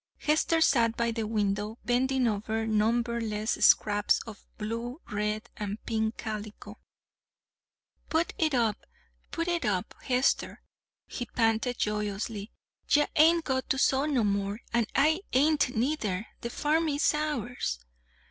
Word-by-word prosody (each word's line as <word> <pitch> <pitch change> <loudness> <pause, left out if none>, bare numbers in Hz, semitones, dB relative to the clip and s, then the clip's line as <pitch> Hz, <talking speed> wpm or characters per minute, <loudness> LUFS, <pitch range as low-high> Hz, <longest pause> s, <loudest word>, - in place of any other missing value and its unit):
Hester 315 +2 +1
sat 235 -7 +3
by 235 0 +1
the 225 -1 -3
window, 210 0 -1
bending 255 +1 +2
over 220 +1 -1
numberless 225 0 0
scraps 205 -1 +4
of 220 -3 -11
blue, 230 +5 -4
red, 210 +2 -2
and 210 -1 -4
pink 220 -1 -1
calico. 215 -1 -7 1.3
"Put 325 +1 0
it 310 -4 +2
up, 225 -3 0 0.5
put 335 +1 -3
it 345 -1 0
up, 185 -3 -1
Hester," 255 0 0 0.4
he 245 - -6
panted 225 +1 0
joyously. 210 0 -3 0.4
"Ye 295 0 +5
hain't 330 +2 +5
got 260 -1 -1
to 270 - +1
sew 270 +1 +2
no 270 -6 +1
more, 200 +1 -1
an' 235 -2 +2
I 310 +6 +3
hain't 285 -1 +2
neither. 225 -6 -1
The 235 - -5
farm 315 +5 +1
is 290 +1 +2
ours!" 250 - -2
235 Hz, 130 wpm, -28 LUFS, 210-275 Hz, 1.3 s, Ye